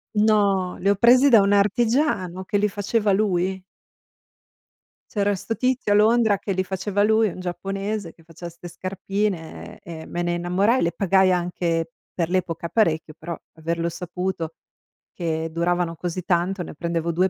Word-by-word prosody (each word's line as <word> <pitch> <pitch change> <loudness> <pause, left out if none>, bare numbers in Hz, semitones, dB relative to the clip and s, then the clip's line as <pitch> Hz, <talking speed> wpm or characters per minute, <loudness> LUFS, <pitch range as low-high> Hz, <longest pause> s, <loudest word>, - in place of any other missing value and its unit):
No, 200 -4 +2
li 195 - +1
ho 200 - +4
presi 250 +6 +6
da 225 -4 +7
un 200 +1 +2
artigiano 205 - +1
che 205 - 0
li 210 +1 +2
faceva 205 +1 0
lui. 190 -2 +1 1.5
C'era 205 -1 +1
'sto 225 +4 -4
tizio 250 -4 +1
a - - +4
Londra 220 -1 +4
che 195 - -5
li 185 0 0
faceva 195 +2 -1
lui, 220 0 +3
un 180 - -9
giapponese 195 +2 -4
che 165 - -23
faceva 170 +1 -9
'ste 175 +1 -11
scarpine 190 -1 -4
e 165 -2 -8
e - - -10
me 175 - -4
ne 175 0 0
innamorai, 185 +8 +1
le 170 - +1
pagai 190 +1 +3
anche 170 -2 -1 0.2
per 170 -2 -1
l'epoca 170 -2 -1
parecchio, 165 -7 +1
però 165 0 -6 0.2
averlo 165 +1 -2
saputo 170 -1 -4 0.6
che 160 -2 -2
duravano 170 0 0
così 175 +1 -4
tanto, 180 +1 0
ne - - -8
prendevo 170 +1 -2
2 185 +3 +2
185 Hz, 165 wpm, -23 LUFS, 170-205 Hz, 1.5 s, da